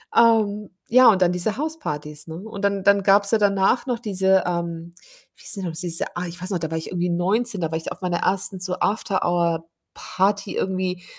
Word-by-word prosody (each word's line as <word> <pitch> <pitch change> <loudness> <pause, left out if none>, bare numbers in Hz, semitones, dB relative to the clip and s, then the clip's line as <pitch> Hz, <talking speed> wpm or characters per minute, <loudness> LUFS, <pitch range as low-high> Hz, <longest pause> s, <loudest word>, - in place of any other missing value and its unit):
Ähm, 215 -3 +3 0.2
ja 255 +2 +7
und 190 -4 +3
dann 180 - +4
diese 180 +5 -2
House-Partys, 150 - -5
ne? 160 - -7
Und 200 +3 -8
dann 200 -1 0
dann 200 +1 +4
gab's 200 +1 +4
ja 225 - +4
danach 200 +4 +2
noch 245 -2 -1
diese, 190 -3 +2
ähm, 170 -1 -4 0.4
wie - - -20
hießen 200 -4 -5
die - - -2
noch, 160 - -8
diese 170 0 -1
Ah, 175 - -3
ich 170 +1 -9
weiß 185 +2 -4
noch, 185 - -1
da 160 -1 -3
war 160 - -1
ich 160 - -5
irgendwie 180 0 -2
19, 195 +6 0
da 165 -2 -2
war 160 - -1
ich 160 - -6
auf - - -8
meiner 175 -2 -1
1. 195 0 0
so 180 0 -2
After 200 -2 0
Hour-Party 175 +4 -1
irgendwie, 185 -1 -2
190 Hz, 215 wpm, -23 LUFS, 175-205 Hz, 0.4 s, ja